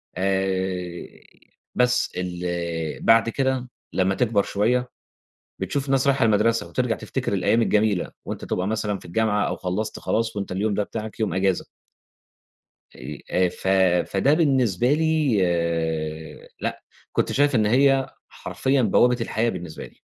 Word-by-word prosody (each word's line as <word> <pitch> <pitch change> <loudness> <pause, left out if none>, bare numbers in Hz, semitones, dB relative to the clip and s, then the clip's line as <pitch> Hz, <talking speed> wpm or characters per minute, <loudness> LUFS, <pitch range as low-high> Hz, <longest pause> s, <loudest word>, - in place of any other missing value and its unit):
آآ، 95 -2 -1 0.7
بس 125 0 +2
ال 90 -1 -4 0.6
بعد 115 0 +5
كده 130 0 -1 0.2
لمّا 95 +1 +1
تكبر 110 -4 +2
شوية، 125 +5 0 0.7
بتشوف 140 -1 -2
ناس 135 0 +2
رايحة 135 -3 +3
المدرسة 115 +1 +2
وترجع 125 -3 -1
تفتكر 130 -4 -4
الأيام 100 +4 +2
الجميلة، 105 -4 +1
وأنت - - -6
تبقى 90 - -2
مثلًا 105 -2 -1
في - - -16
الجامعة 105 +3 0
أو - - -3
خلّصت 105 +4 -3
خلاص 115 -1 -1
وأنت 100 -2 -3
اليوم 100 +3 0
ده 105 - +1
بتاعك 110 +1 -6
يوم 105 -6 0
أجازة. 95 -1 0 1.3
أي - - -9
آآ، 90 0 +3
ف 95 - -8 0.4
فده 100 +9 +3
بالنسبة 130 - +2
لي 155 -6 +2 1.2
لأ، - - -4 0.3
كنت - - 0
شايف 145 0 +2
إن 110 -3 +3
هي 135 +3 +3 0.2
حرفيًا 135 0 -1
بوابة 120 +3 +4
الحياة 115 0 0
بالنسبة 85 -7 -6
لي. - - -18
110 Hz, 135 wpm, -23 LUFS, 95-125 Hz, 1.3 s, بعد